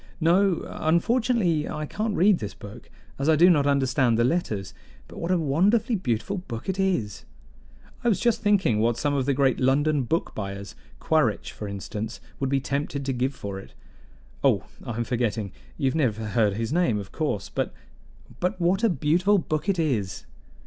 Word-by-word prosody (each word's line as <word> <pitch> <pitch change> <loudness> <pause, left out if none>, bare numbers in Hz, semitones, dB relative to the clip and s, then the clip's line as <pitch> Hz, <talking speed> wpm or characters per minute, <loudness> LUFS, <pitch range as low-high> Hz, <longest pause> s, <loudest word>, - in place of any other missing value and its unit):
"No, 180 +2 +3
unfortunately, 175 -1 +1
I 150 - -3
can't 210 +6 -2
read 195 0 +4
this 105 -1 -6
book, 100 0 -11 0.3
as 140 +3 +1
I 160 - +6
do 175 +4 +6
not 145 -4 +3
understand 130 -4 +2
the 115 - +3
letters. 115 - -1 0.3
But - - -10
what 170 - -3
a 185 - +3
wonderfully 200 - +2
beautiful 180 - -2
book 115 -10 -7
it 190 0 -2
is! 175 - 0 0.8
I 240 - +3
was 210 - +2
just 235 -3 +1
thinking 195 - +2
what 115 +1 +2
some 145 +3 0
of 135 -2 0
the 140 - +2
great 135 -1 +2
London 145 +3 +2
book 160 +7 -1
buyers 100 0 -6 0.3
Quaritch, 155 - +1
for 105 - -7
instance 105 +3 -5 0.2
would 135 - -1
be 135 0 +2
tempted 140 +1 -3
to 135 - -1
give 130 +2 -1
for 100 -1 -6
it. 95 - -14 0.7
Oh, - - +3 0.2
I 120 -2 -5
am 120 - 0
forgetting 115 -4 -1 0.3
you 140 - -2
have 130 - +2
never 115 -8 0
heard 105 -2 +2
his 115 +5 -2
name, 170 -11 +2
of 100 -2 -6
course; 150 - -2
but - - -2 0.7
but 180 +1 -1
what 180 +5 +1
a 230 - +5
beautiful 175 +5 +2
book 155 +1 -2
it 195 - +2
is!" 120 - -1
145 Hz, 185 wpm, -25 LUFS, 115-180 Hz, 0.8 s, I